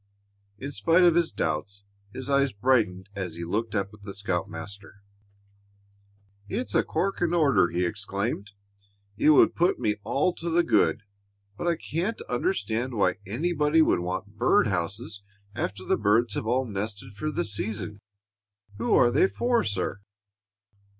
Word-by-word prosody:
In 140 +6 -6
spite 165 - +3
of 175 -1 +6
his 170 0 +2
doubts, 90 +6 -3 0.3
his 130 +3 -5
eyes 140 -1 +2
brightened 100 -4 +1
as 90 -4 -4
he 85 - -6
looked 105 +6 -2
up 100 0 -1
at 105 - -15
the 100 -1 -8
scoutmaster. 100 +1 -5 1.5
"It's 255 - -3
a - - +4
corking 175 -3 -1
order!" 140 - +4
he 90 +1 0
exclaimed. 100 +2 -3 0.6
"It 130 +8 +3
would 150 - +6
put 175 +2 +2
me 105 0 0
all 140 - +1
to 170 - -3
the 170 +1 +3
good. 115 -8 +2 0.5
But 170 - -4
I 170 - +3
can't 175 +8 -3
understand 120 - -1
why 95 -1 +1
anybody 150 - +2
would - - +2
want 95 +4 -5
bird 125 +2 +4
houses 100 +3 -3 0.3
after 95 -2 -4
the - - +2
birds 110 +3 +2
have - - -3
all 130 +3 +1
nested 100 -1 -5
for 105 +10 -3
the 150 - -2
season. 105 0 -4 0.8
Who - - +2
are 120 - +5
they 185 - +4
for, 240 +3 +1
sir?" 100 0 -2
110 Hz, 150 wpm, -26 LUFS, 100-150 Hz, 1.5 s, of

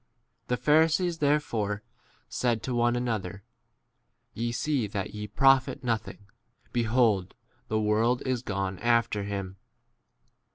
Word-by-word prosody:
The 125 - 0
Pharisees 160 +4 +3
therefore 115 -9 0 0.4
said 120 -3 -1
to 130 - -3
one 120 0 +2
another, 105 -6 -3 0.9
Ye 120 +1 -2
see 125 -1 0
that 100 -1 -4
ye 105 0 -5
profit 135 +5 +3
nothing; 110 -4 -3 0.5
behold, 115 -5 +2 0.3
the 110 - 0
world 110 +4 +1
is 130 -2 0
gone 95 -5 -3
after 115 -3 +2
him. 100 -2 -5
115 Hz, 115 wpm, -28 LUFS, 105-125 Hz, 0.9 s, Pharisees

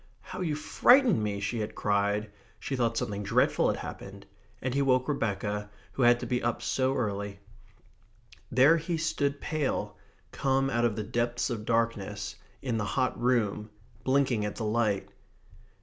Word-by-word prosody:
"How 185 0 -7
you 160 -4 0
frightened 245 - +4
me!" 105 -1 -2
she 100 +4 -2
had 105 - -4
cried. 100 +1 0 0.3
She 135 - -3
thought 115 -2 0
something 100 -2 -2
dreadful 100 - +2
had - - 0
happened. - - -8 0.3
And 130 -1 -2
he 140 - +1
woke 130 -2 +2
Rebecca, 105 -6 -2 0.2
who - - -4
had 120 0 +5
to - - -3
be 125 -1 -1
up 120 -1 -1
so 130 0 +1
early. 100 -4 -2 1.1
There 135 +7 +6
he 165 +1 -2
stood 145 -3 -1
pale, 155 -4 -2 0.4
come 135 0 +1
out 120 -1 +2
of 110 -3 +1
the 110 - -3
depths 120 +3 -1
of 110 -3 -4
darkness, 115 -3 -1 0.3
in 120 -4 -1
the - - -1
hot 130 +4 -1
room, 110 -4 +1 0.3
blinking 130 -5 +2
at 105 - -3
the 110 - -3
light. 105 -2 +1
120 Hz, 165 wpm, -29 LUFS, 105-135 Hz, 1.1 s, There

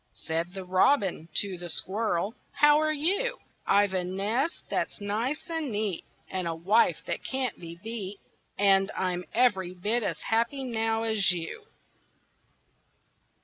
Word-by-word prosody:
Said 165 +3 -3
the 190 -1 -5
Robin 185 - +2
to 190 -1 -1
the 175 0 -6
Squirrel, 195 +3 -1 0.2
"How 295 +1 +6
are 310 0 +2
you?" 370 +11 +1 0.3
"I've 200 -1 +4
a 185 -1 0
nest 210 - -1
that's - - -2
nice 225 - -2
and 325 -5 -2
neat, 205 -4 -2 0.2
And 185 -2 -3
a 165 - -2
wife 195 +8 +2
that - - -3
can't 260 -4 -2
be 170 -1 -8
beat, 210 -3 -5 0.4
And 195 -1 +5
I'm 180 -1 -1
every 190 -7 +2
bit 215 +7 +1
as 205 - -2
happy 235 +5 0
now 225 -2 0
as 220 -5 +3
you." 180 - -4
205 Hz, 145 wpm, -28 LUFS, 185-245 Hz, 0.4 s, How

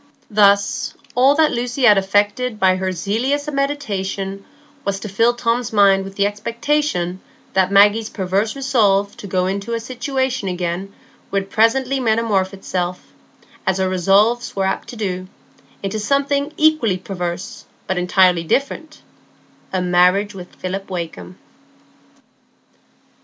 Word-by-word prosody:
Thus, 200 -1 +3 0.2
all 265 +3 +4
that 310 0 +3
Lucy 245 +2 -2
had 210 -4 +7
effected 205 +4 0
by 185 -1 +3
her 190 0 -2
zealous 235 - -1
mediation 200 -9 -3 0.4
was 200 -3 -2
to 215 - -6
fill 230 +5 +2
Tom's 240 -1 -1
mind 200 -2 +4
with 195 0 -9
the 200 - +2
expectation 210 -3 -1 0.3
that 190 0 +2
Maggie's 205 +2 +5
perverse 195 +4 -1
resolve 210 -7 +1
to 205 - -8
go 185 -1 0
into 200 +5 -2
a - - -2
situation 255 -1 -2
again 180 +1 -3 0.4
would 195 0 -2
presently 260 +4 +2
metamorphose 220 -5 +1
itself, 180 -2 -4 0.5
as 190 0 +2
her 190 0 +1
resolves 195 +6 +2
were 195 -1 0
apt 190 - -2
to - - -8
do, 185 -4 -3 0.6
into 195 +2 -2
something 280 +5 0
equally 310 -11 +3
perverse, 180 -2 -5 0.2
but 190 -1 -1
entirely 180 -1 +3
different,—a 275 - -5
marriage 180 +3 +3
with 180 -2 -11
Philip 195 +2 -5
Wakem. 160 - -6
200 Hz, 130 wpm, -19 LUFS, 190-240 Hz, 0.6 s, had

